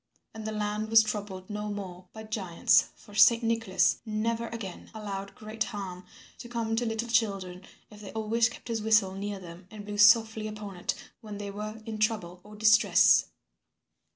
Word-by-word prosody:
And 220 -1 -7
the - - -2
land 210 0 -2
was 225 0 +7
troubled 200 -3 -5
no 210 0 -4
more 185 -3 -7
by 220 - -9
giants, 200 -6 +2
for 205 - -17
Saint 230 +3 +6
Nicholas 225 -4 +2
never 230 +1 -2
again 215 -6 -7
allowed 200 -2 -6
great 215 0 -4
harm 190 -5 -7 0.3
to 240 - -9
come 230 -2 -2
to 240 0 0
little 225 +1 -2
children 195 -6 0 0.3
if 210 0 -13
they 200 - -9
always 225 +2 +1
kept 240 - -12
his 230 -2 -2
whistle 210 -3 +3
near 200 +1 -4
them 175 0 -12
and 210 -1 -10
blew 205 0 -5
softly 220 +1 +5
upon 210 -2 -7
it 175 - -2 0.3
when 210 -3 -8
they 200 0 -5
were 215 +2 -6
in 220 -2 -5
trouble 210 -5 -1
or 210 0 -13
distress. 215 +1 +5
215 Hz, 180 wpm, -28 LUFS, 200-225 Hz, 0.3 s, was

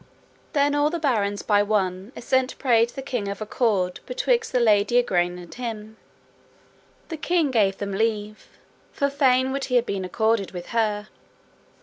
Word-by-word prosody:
Then 285 -1 +2
all 290 +1 +2
the 340 - -2
barons 210 -10 0
by 205 -1 +3
one 195 -1 -1
assent 260 +1 0
prayed 235 -3 +3
the 270 - -8
king 245 -6 -3
of 200 0 -4
accord 210 -4 0
betwixt - - 0
the 250 - +2
lady 220 +1 +3
Igraine 180 -7 +1
and 175 -1 -11
him; 220 -3 -6 1.1
the 325 - -5
king 325 -2 +1
gave 200 -5 +2
them 200 -1 -4
leave, 215 0 -2 0.4
for 280 0 -1
fain 260 -2 +3
would 275 0 -2
he 250 - -2
have 240 -1 +3
been 195 -1 -3
accorded 220 +2 0
with 175 -1 -7
her. 215 -2 -1
225 Hz, 160 wpm, -24 LUFS, 205-265 Hz, 1.1 s, by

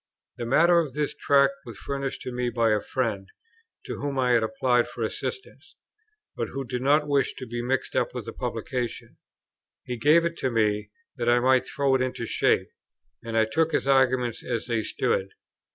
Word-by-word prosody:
The 120 - -4
matter 170 +7 +5
of 155 -5 -2
this 150 -1 -1
Tract 140 -1 +3
was 115 -4 -10
furnished 140 +2 -4
to 125 - -5
me 125 0 -1
by 115 -1 +2
a 105 -1 +2
friend, 110 -7 -2 0.6
to - - -6
whom 140 -1 -3
I 125 -1 +2
had 120 -2 +4
applied 120 +1 +1
for - - -5
assistance, 395 - -5 0.6
but - - -2
who 135 0 -5
did 125 0 -4
not 145 +3 +3
wish 140 -2 +1
to 130 - -7
be 120 0 -4
mixed 130 +2 -2
up - - 0
with - - -5
the - - -7
publication. 125 -2 -4 0.7
He 125 - -5
gave 155 +8 +4
it 170 0 -3
me, 110 -4 0 0.3
that 120 -1 0
I 120 0 +5
might 130 +1 +3
throw 140 -2 +1
it 130 - +2
into 125 -2 -2
shape, - - +1 0.5
and 115 -1 -3
I 110 - +4
took 160 +8 0
his - - +1
arguments 130 -3 +2
as 120 -3 -3
they 115 -2 0
stood. 95 -2 -1
125 Hz, 190 wpm, -26 LUFS, 120-140 Hz, 0.7 s, matter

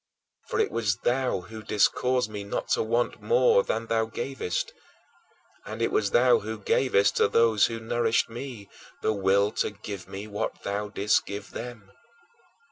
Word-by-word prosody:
For - - -2
it - - +2
was 110 -4 0
thou 125 -5 +1
who 110 +4 -10
didst 105 -1 +2
cause 125 -3 +1
me 105 -1 -6
not 100 - -4
to - - +2
want 115 +2 0
more 485 0 +4
than 115 - -2
thou 115 0 +1
gavest 115 -4 -3 0.9
and 110 +1 -7
it 115 - +1
was 100 -2 +1
thou 125 +3 +5
who 110 +2 -5
gavest 100 -1 +2
to - - +4
those 110 -1 +4
who 115 -1 -5
nourished 115 0 +1
me 115 -3 -8 0.4
the 110 - +2
will 100 +1 +2
to - - +1
give 100 -2 -8
me 100 +2 -7
what 105 -1 -4
thou 105 +1 -2
didst 100 0 +1
give 100 0 -6
them. 115 -4 -8
110 Hz, 170 wpm, -27 LUFS, 100-120 Hz, 0.9 s, thou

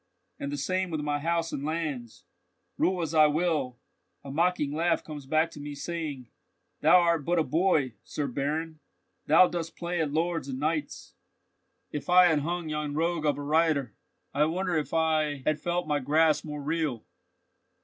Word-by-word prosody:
And 140 - -4
the 145 - -3
same 185 +6 -1
with 155 -3 -2
my 145 0 -1
house 165 +1 -1
and 140 - -4
lands. 150 -7 -4 0.5
Rule 180 -1 +1
as 160 0 -4
I 155 -1 +6
will, 150 -5 0 0.5
a 140 - -7
mocking 165 -1 +1
laugh 165 +3 +1
comes 145 -3 -9
back 155 +3 +2
to - - -11
me, 145 0 -6
saying: 145 -5 -5 0.5
'Thou 160 +4 +6
art 170 -3 +2
but 175 +4 0
a 165 - +4
boy, 155 -6 +1
Sir 150 - -3
Baron, 150 +4 -3 0.5
thou 165 +4 +7
dost 165 -2 -4
but - - -44
play 175 0 -2
at 150 -3 -1
lords 165 0 -1
and 130 -1 -4
knights.' 155 +1 -3 0.8
If 145 0 -5
I 180 0 +7
had 155 -3 +2
hung 170 +3 -3
yon 150 -1 -3
rogue 165 0 0
of 145 - +1
a 145 - -5
reiter, 150 -5 +1 0.4
I 150 +2 +3
wonder 180 +2 -1
if 155 -2 -1
I 155 -4 +1
had 155 0 +1
felt 175 0 -1
my 150 -1 +1
grasp 155 +3 +2
more 150 -1 -6
real?" 150 -6 -2
155 Hz, 180 wpm, -28 LUFS, 145-170 Hz, 0.8 s, thou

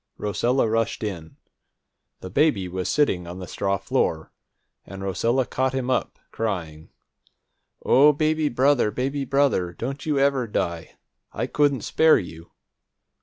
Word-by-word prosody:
Rosella 120 +5 0
rushed 115 0 -1
in. 85 -7 -6 0.9
The 95 - -8
baby 120 - +2
was 90 +1 -4
sitting 95 -13 +1
on 90 +1 -7
the 95 - -7
straw 100 +2 -1
floor, 80 -3 -1 0.5
and 95 0 -9
Rosella 115 +7 0
caught 130 +2 -1
him 130 -1 -1
up, 125 - -1
crying: 85 -8 -4 1.0
"O 145 +3 +6
baby, 155 +1 0
baby 135 +1 +1
brother, 135 -12 +1
don't 135 +7 -5
you 150 -2 -1
ever 135 -3 +2
die! 85 -5 -3 0.4
I - - -3
couldn't 145 -4 +1
spare 160 +9 +4
you!" 85 -3 -8
115 Hz, 130 wpm, -24 LUFS, 95-140 Hz, 1.0 s, O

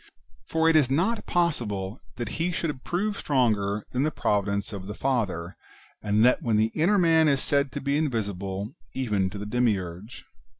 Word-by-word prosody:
For 160 0 +2
it 165 - +4
is 145 -5 +5
not 185 +12 0
possible 115 - -1
that 120 +6 -4
he 175 +2 +1
should 150 -6 -3
prove 200 +4 -1
stronger 105 -7 +1
than 125 - 0
the 150 - +2
providence 100 -6 -1
of 95 -2 -6
the 105 - -6
Father, 100 -11 -1 0.5
and 105 +2 +3
that 125 - +4
when 115 -3 +1
the 110 +1 +2
inner 180 +7 +3
man 165 -3 +4
is 140 -2 +3
said 140 +1 +1
to 145 - -4
be 140 +1 0
invisible 100 -8 -2 0.2
even 105 -7 0
to 100 - -8
the 100 - -5
Demiurge. 105 -3 -2
120 Hz, 175 wpm, -26 LUFS, 100-150 Hz, 0.5 s, is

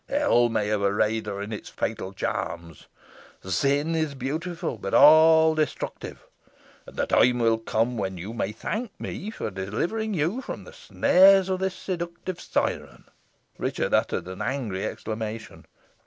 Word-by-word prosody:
Hell 195 - +3
may 110 -2 0
have 105 -1 0
arrayed 105 +2 +1
her 100 -1 -4
in 105 +2 -6
its 105 - -7
fatal 95 - -4
charms. 85 -4 -5 0.6
Sin 140 - +1
is 155 -3 -1
beautiful, 155 - -4
but 95 - -2
all 160 +1 +7
destructive. 155 -1 -4 0.6
And - - -12
the - - 0
time 125 0 +4
will 115 -1 +2
come 115 +2 -1
when 95 -2 -3
you 95 +6 -7
may 105 -3 -2
thank 215 - -5
me 205 - -5
for 220 - -5
delivering 165 - -2
you 175 - -1
from - - -7
the - - -13
snares 190 0 +4
of 185 -1 -1
this 190 0 -2
seductive 175 0 -5
siren." - - -2 0.6
Richard - - -2
uttered - - +1
an 95 0 -7
angry 115 -9 -2
exclamation. 110 0 -6
125 Hz, 150 wpm, -25 LUFS, 105-170 Hz, 0.6 s, all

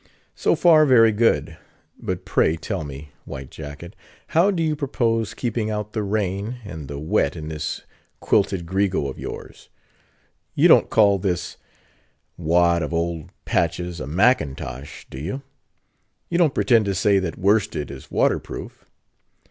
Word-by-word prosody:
So - - +1
far, 155 -3 +5
very 115 -4 +6
good; 115 +2 +1 0.4
but - - -4
pray, 80 - +2
tell 90 +1 -4
me, 70 +1 -9
White 65 0 -8
Jacket, 80 +5 -9 0.3
how 170 +5 +4
do 175 -5 0
you 155 -1 +1
propose 115 -6 -1
keeping 115 -3 -2
out 105 0 -4
the 110 - -1
rain 100 +2 -2
and 80 -7 -7
the 70 +1 -6
wet 75 +2 0
in 75 0 -6
this 75 -1 -4 0.4
quilted 95 -4 +1
grego 95 -5 0
of - - -8
yours? - - -8 0.9
You - - +5
don't - - +6
call 100 -3 +4
this 90 -3 -2 0.8
wad 85 +1 +2
of 80 +2 -3
old 85 -1 -2 0.2
patches 85 +1 -1
a - - -5
Mackintosh, 75 - 0
do 65 - -7
you?——you 135 - -8
don't 160 -6 +3
pretend 115 -4 +3
to 100 -1 -1
say 100 +1 +3
that 90 -4 -4
worsted 100 -7 +1
is 70 - -10
water - - +2
proof? - - -9
95 Hz, 150 wpm, -23 LUFS, 80-115 Hz, 0.9 s, very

